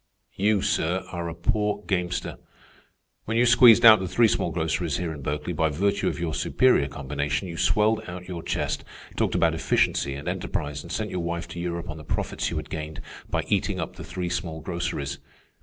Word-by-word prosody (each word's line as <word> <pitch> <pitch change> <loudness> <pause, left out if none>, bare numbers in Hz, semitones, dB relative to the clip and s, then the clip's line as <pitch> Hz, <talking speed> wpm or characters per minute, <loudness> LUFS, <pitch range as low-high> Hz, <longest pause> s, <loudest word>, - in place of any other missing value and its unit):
"You, 100 0 +2
sir, 85 +4 0
are 85 -1 -3
a 85 - -6
poor 105 +3 0
gamester. 90 -3 -2 0.9
When 115 +1 -1
you 120 - +5
squeezed 120 -1 +7
out 110 -1 +10
the 95 - -3
three 115 +6 +4
small 95 - 0
groceries 80 -2 -1
here 85 -2 -3
in 75 - -8
Berkeley 75 +5 -3
by 80 0 +1
virtue 100 +7 0
of - - -2
your 85 -2 -2
superior 125 - +3
combination, 70 +4 -3
you 85 - -6
swelled 105 +5 +2
out 90 0 -7
your 90 -2 -5
chest, - - -2 0.3
talked - - 0
about - - +3
efficiency 70 - +1
and 70 - -8
enterprise, 75 0 -3
and - - -10
sent - - -2
your 90 - -2
wife 85 0 -3
to 85 - -7
Europe 85 0 -3
on 75 - -6
the 75 - -10
profits - - -2
you 85 - -3
had 75 - -6
gained 80 -2 -5 0.3
by - - 0
eating - - 0
up - - -4
the - - -8
three 90 -2 -4
small 85 -3 -3
groceries. 80 -4 -3
85 Hz, 200 wpm, -25 LUFS, 80-95 Hz, 0.9 s, out